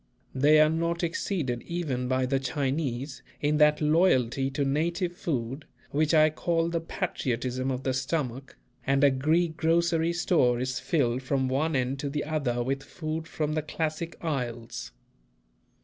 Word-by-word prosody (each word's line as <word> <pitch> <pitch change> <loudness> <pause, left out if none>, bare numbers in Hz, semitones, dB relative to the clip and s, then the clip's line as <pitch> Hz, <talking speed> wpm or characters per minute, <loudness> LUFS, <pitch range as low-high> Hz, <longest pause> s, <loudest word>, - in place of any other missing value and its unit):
They 145 +4 +5
are 155 - +7
not 170 +2 -1
exceeded 165 -7 -1
even 145 -8 -3
by 130 0 +1
the 135 +1 +1
Chinese 135 0 -2 0.2
in 150 +1 +1
that 150 0 +4
loyalty 135 -5 +3
to 140 +1 -1
native 170 +6 0
food 135 -5 -3 0.3
which 150 +1 +2
I 155 0 +6
call 165 +1 0
the 170 -1 -1
patriotism 130 -7 -2
of 130 0 -3
the 130 - 0
stomach, 135 -1 -3 0.3
and 135 +1 +2
a 140 - +7
Greek 160 +5 +1
grocery 170 0 +2
store 145 -8 +2
is 130 0 -2
filled 130 -6 0
from 130 0 0
one 145 +4 0
end 130 +1 0
to 140 - -2
the 145 +1 -2
other 140 -6 -1
with 135 +2 -2
food 160 +2 -5
from 155 -2 -2
the 155 - 0
classic 155 +2 -3
isles. 125 -8 -4
145 Hz, 155 wpm, -28 LUFS, 130-160 Hz, 0.3 s, are